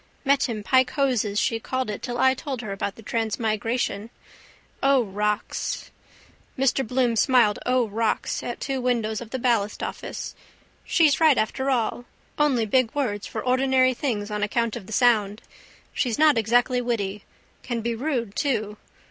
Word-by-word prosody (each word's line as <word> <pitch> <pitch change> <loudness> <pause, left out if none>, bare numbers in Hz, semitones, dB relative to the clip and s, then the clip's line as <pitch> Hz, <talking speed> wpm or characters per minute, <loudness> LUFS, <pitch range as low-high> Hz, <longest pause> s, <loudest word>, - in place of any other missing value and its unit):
Met 280 -1 +3
him 215 -3 -4
pike 260 +2 +3
hoses 240 -7 0
she 230 -3 0
called 260 +3 -2
it 205 - -6
till 240 0 -4
I 260 +1 +4
told 265 -2 -5
her 215 -4 -6
about 195 0 -3
the 225 - -14
transmigration. 225 0 -1 0.7
O 275 -2 +4
rocks! 210 0 -2 0.7
Mr 270 0 +2
Bloom 245 -1 +1
smiled 230 -2 +3
O 250 -2 +2
rocks 220 +1 -1
at 240 - -5
two 270 -2 -2
windows 230 -3 0
of 235 - -8
the 260 - -3
ballastoffice. 230 -5 -2 0.5
She's 305 -5 +3
right 315 -4 +5
after 265 +5 0
all. 245 -1 0 0.3
Only 270 -6 +3
big 240 +2 +2
words 210 -8 -2
for 220 - -5
ordinary 255 0 +3
things 225 -6 -3
on 210 0 -2
account 230 +2 0
of 210 -6 -8
the - - -10
sound. 215 -3 +2 0.5
She's 240 -4 -1
not 305 -1 +5
exactly 245 +3 +2
witty. 210 -4 -2 0.4
Can 240 -2 -3
be 235 +1 -1
rude 235 -4 -2
too. 215 -7 -1
235 Hz, 155 wpm, -24 LUFS, 215-260 Hz, 0.7 s, right